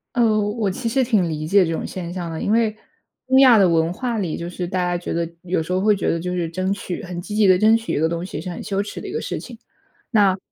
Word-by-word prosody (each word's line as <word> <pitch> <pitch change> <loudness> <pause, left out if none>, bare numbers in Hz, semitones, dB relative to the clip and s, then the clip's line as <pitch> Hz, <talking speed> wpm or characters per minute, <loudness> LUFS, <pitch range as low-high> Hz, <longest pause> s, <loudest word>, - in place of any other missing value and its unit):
呃， 225 -3 +3
我 210 0 -1
其 230 +5 -4
实 260 +3 +2
挺 215 -8 +1
理 155 -1 -3
解 190 +3 +4
这 165 - -2
种 - - -3
现 175 -2 -6
象 175 -2 -4
的， 160 - -5
因 - - -2
为 220 -1 +2 0.5
东 260 0 +4
亚 255 -4 +8
的 195 -3 +5
文 165 -1 +2
化 240 +5 -3
里 180 -7 -2
就 170 +1 -5
是 180 0 -4
大 185 +1 -2
家 175 0 0
觉 175 - -6
得 170 0 -1
有 180 -2 -1
时 180 +3 -3
候 185 - +1
会 210 +1 +4
觉 195 - -2
得 - - +1
就 180 +2 -4
是 175 -2 -1
争 185 +3 -2
取 200 -2 -4
很 180 -1 -6
积 205 +4 -6
极 215 -1 +4
地 185 -1 +6
争 220 +2 +5
取 230 0 -3
一 - - 0
个 160 - +2
东 170 +1 -3
西， 185 - -6
是 180 +3 -6
很 175 - -6
羞 200 -1 -1
耻 205 - -7
的 - - -7
一 - - -6
个 - - -2
事 - - -4
情。 - - -10 0.5
那 200 -4 +4
185 Hz, 320 characters per minute, -21 LUFS, 170-215 Hz, 0.5 s, 亚